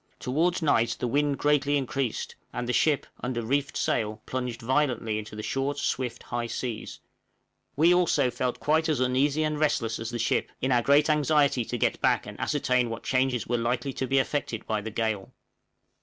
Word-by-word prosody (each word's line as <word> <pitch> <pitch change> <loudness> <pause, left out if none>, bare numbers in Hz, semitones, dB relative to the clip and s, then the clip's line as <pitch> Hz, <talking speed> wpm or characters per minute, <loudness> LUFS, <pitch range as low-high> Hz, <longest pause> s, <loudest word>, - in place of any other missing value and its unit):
Towards 165 +7 0
night 120 -6 +2
the - - -1
wind 145 +2 +1
greatly 145 -1 +2
increased, 135 -3 -2 0.2
and 120 0 -4
the 125 - 0
ship, 150 0 +2
under 120 -1 -3
reefed 140 +4 -1
sail 110 0 -1
plunged 125 -2 -3
violently 120 -4 0
into 105 0 -8
the 110 - -6
short, 135 +4 -1
swift, 125 -3 -2
high 120 -1 -3
seas; 115 -1 -5 0.8
we 165 +5 +5
also 155 -7 +3
felt 125 +1 -2
quite 160 +2 +2
as 150 -5 +1
uneasy 135 +4 +2
and 155 -1 -1
restless 125 -7 0
as 115 0 -4
the 120 - -4
ship, 120 - 0
in 130 - 0
our 120 -1 +4
great 140 +4 +4
anxiety 145 -3 +3
to 120 - -3
get - - 0
back - - +2
and - - -9
ascertain 125 -2 +1
what 115 - -6
changes 130 -3 +1
were 120 0 0
likely 120 +3 -1
to 130 - -3
be 135 - +2
effected 130 -4 -1
by 110 -1 -1
the 110 - -5
gale. 110 -3 -2
130 Hz, 185 wpm, -27 LUFS, 120-145 Hz, 0.8 s, we